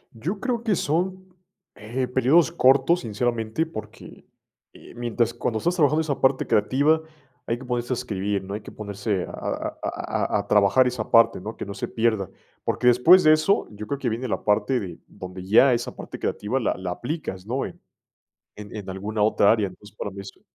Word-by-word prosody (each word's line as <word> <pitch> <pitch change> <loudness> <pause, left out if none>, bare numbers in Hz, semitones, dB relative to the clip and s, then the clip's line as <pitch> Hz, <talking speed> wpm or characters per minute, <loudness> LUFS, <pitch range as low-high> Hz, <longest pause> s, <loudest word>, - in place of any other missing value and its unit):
Yo 175 - -4
creo 245 -1 -1
que 220 -4 +2
son, 185 +4 -2 0.4
eh, 120 +4 -3
periodos 130 +5 +3
cortos, 135 +6 +4
sinceramente, 115 +5 -1
porque, 110 -9 -10 0.5
eh, - - -15
mientras 120 -1 -1
cuando 120 -1 -2
estás 175 +11 0
trabajando 155 -1 +3
esa 150 -4 -3
parte 130 0 +3
creativa, 140 +9 +2 0.5
hay 115 - 0
que 130 - -11
ponerse 120 0 -2
a - - 0
escribir, 100 -4 -2
¿no? 100 +1 -7
Hay 105 - -4
que - - -11
ponerse 100 -2 -3
a - - -11
a - - -4
a - - -2
a - - 0
a - - -5
trabajar 105 +5 +4
esa 125 - -3
parte, 115 -5 +5
¿no? 110 +3 -7
Que - - -5
no 100 - -6
se - - -4
pierda. 110 -5 0 0.3
Porque 125 - 0
después 145 +10 +7
de 155 - +7
eso, 155 +6 +2
yo 105 0 -8
creo 140 - -2
que 125 -4 -1
viene 120 +4 -3
la - - -3
parte 105 +5 +2
de 90 -6 -7
donde 95 0 -9
ya 115 +7 +5
esa 120 0 -2
parte - - -8
creativa 120 +6 -2
la 115 - 0
la 90 -1 -4
aplicas, 120 - -5
¿no? 130 +4 -1
En - - -9 0.8
en 105 -1 -10
en 105 -3 -7
alguna 105 +3 -3
otra 105 -1 +4
área. 110 -3 +1
Entonces, 105 +3 -16
para 105 - -4
mí 100 +1 -9
eso 100 - -12
120 Hz, 200 wpm, -24 LUFS, 105-140 Hz, 0.8 s, después